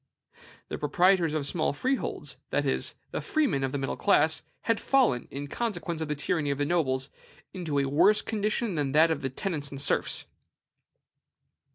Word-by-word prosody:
The - - -4
proprietors 170 +2 +3
of 150 -2 -1
small 155 +2 0
freeholds, 260 - -2
that - - 0
is, - - 0 0.2
the - - -3
freemen 285 - +1
of 135 - -1
the 140 - -2
middle 135 -1 -2
class, 160 -6 +3 0.2
had 230 -2 +1
fallen, 245 - +2
in 140 +1 -6
consequence 175 - -3
of 160 - -2
the 150 - -2
tyranny 145 0 -1
of 140 - 0
the 145 - 0
nobles, 135 -5 0 0.4
into 165 -6 -3
a 140 - +2
worse 155 +10 +4
condition 215 0 -1
than 145 -4 -1
that 160 +2 +5
of 160 - -1
the 135 - -2
tenants 145 0 -4
and 135 - -7
serfs. 145 - 0
155 Hz, 175 wpm, -28 LUFS, 140-195 Hz, 0.4 s, that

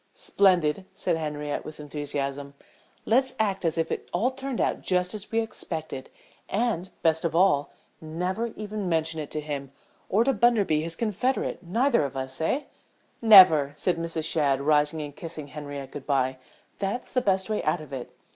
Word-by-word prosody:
"Splendid!" 185 -3 +2
said - - 0
Henriette, 150 -2 -3
with 155 0 -9
enthusiasm. 140 -1 -4 0.5
"Let's 260 +3 +2
act 200 -4 0
as 165 -1 0
if 165 0 0 0.2
all 220 +9 +1
turned 265 -1 -5
out - - 0
just 180 +1 0
as 215 -1 -8
we 230 0 +2
expected, 160 -10 -6 0.4
and, 200 -4 0
best 160 0 +2
of 165 -1 -1
all, 170 -5 +3 0.3
never 180 +8 -2
even 210 -2 -4
mention 160 -1 0
it 150 - -5
to 155 - -3
him, 145 -3 -5 0.4
or 215 +4 +4
to 270 +2 +2
Bunderby 205 -9 +3
his 165 +1 -3
confederate, 230 +6 -1
neither 230 - +2
of 135 -1 -4
us, 130 +2 -5
eh?" 265 - 0 0.6
"Never!" 185 -10 +8
said 175 +2 0
Mrs. 165 -1 -3
Shadd, 145 -4 +2
rising 150 +2 +2
and 145 -1 -8
kissing 160 -5 -7
Henriette 145 -2 -7
good 145 - -8
bye. 130 -2 +1 0.4
"That's 200 +5 -3
the 255 - +2
best 190 -3 +1
way 215 -1 -1
out 155 +3 0
of 150 -2 -10
it. 130 -2 -6
165 Hz, 170 wpm, -26 LUFS, 150-205 Hz, 0.6 s, Never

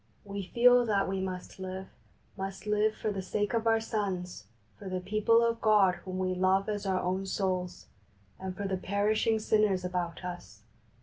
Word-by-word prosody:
We 200 0 -4
feel 245 +2 +5
that 200 -2 +2
we 190 0 -2
must 185 0 -5
live, 190 0 -5 0.5
must 195 +1 -6
live 210 +1 +2
for 215 - -2
the 195 -2 -3
sake 205 +4 -2
of 230 0 0
our 225 0 +4
sons, 190 - -3 0.3
for 195 - -7
the 185 0 -2
people 215 +4 +3
of 230 0 -1
God 210 -4 +5
whom 185 +1 -7
we 185 0 0
love 190 +2 +2
as 205 -2 -3
our 190 -1 +1
own 185 +2 -2
souls, 185 -2 -2 0.5
and 190 -1 -5
for 200 - -2
the 190 -1 -1
perishing 210 +4 +1
sinners 210 -4 +2
about 180 -1 -3
us. 175 -12 -8
195 Hz, 180 wpm, -30 LUFS, 185-215 Hz, 0.5 s, feel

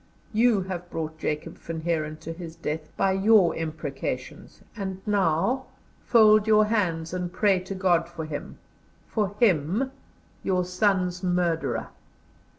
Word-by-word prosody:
You 225 -2 +4
have 180 -2 -6
brought 160 -1 -5
Jacob 155 +2 -3
Van 165 -1 -6
Heeren 155 -2 -1
to 165 +1 -5
his 165 -1 -8
death 155 -1 -4
by 195 - +3
your 195 -1 +4
imprecations, 150 -5 -5
and 190 -3 -4
now, 205 +6 +1 0.4
fold 215 -2 +5
your 215 -1 +5
hands 175 -7 0
and 180 -1 -3
pray 195 0 +3
to 185 +2 -6
God 175 -3 +2
for 165 -2 -6
him 155 -2 -6 0.5
for 205 -2 -1
him, 200 - +2 0.5
your 185 -1 0
son's 180 -1 +1
murderer. 175 -7 0
180 Hz, 135 wpm, -26 LUFS, 160-205 Hz, 0.5 s, fold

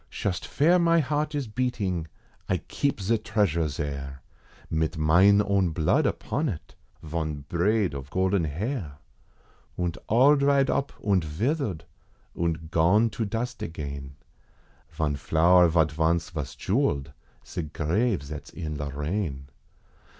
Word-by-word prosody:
Shust 90 -5 -3
vere 170 +6 +3
mine 170 -1 +4
heart 150 +2 -1
is 140 -4 -2
beating, 105 -8 -2 0.4
I - - +2
keep 140 -5 -2
ze 110 +4 +1
treasure 85 -7 +1
zare, 70 -2 -5 0.4
Mit 80 0 -1
mine 95 +7 +5
own 100 -3 +2
blood 80 -1 +2
upon 150 +3 -1
it, 80 -7 -7 0.3
von 80 -2 -3
braid 95 +2 +1
of 70 -1 -7
golden 95 0 +1
hair, 85 - -4 0.8
Und 90 -2 -2
all 135 +7 +5
dried 140 -1 +3
up 140 - -1
und 100 -4 +2
vithered, 100 - -2 0.5
und 80 -1 -2
gone 100 +8 +4
to 110 +1 -2
dust 120 +4 -3
again, 70 -3 -6 0.7
Von 75 -2 -1
flower 85 +4 +4
zat 80 -2 +3
vonce 80 +2 0
vos 75 -4 -5
jewelled 70 0 0 0.3
ze - - -4
grave 85 - 0
zats 75 +1 -8
in 80 -4 -5
Lorraine. 75 0 -3
85 Hz, 130 wpm, -26 LUFS, 75-110 Hz, 0.8 s, mine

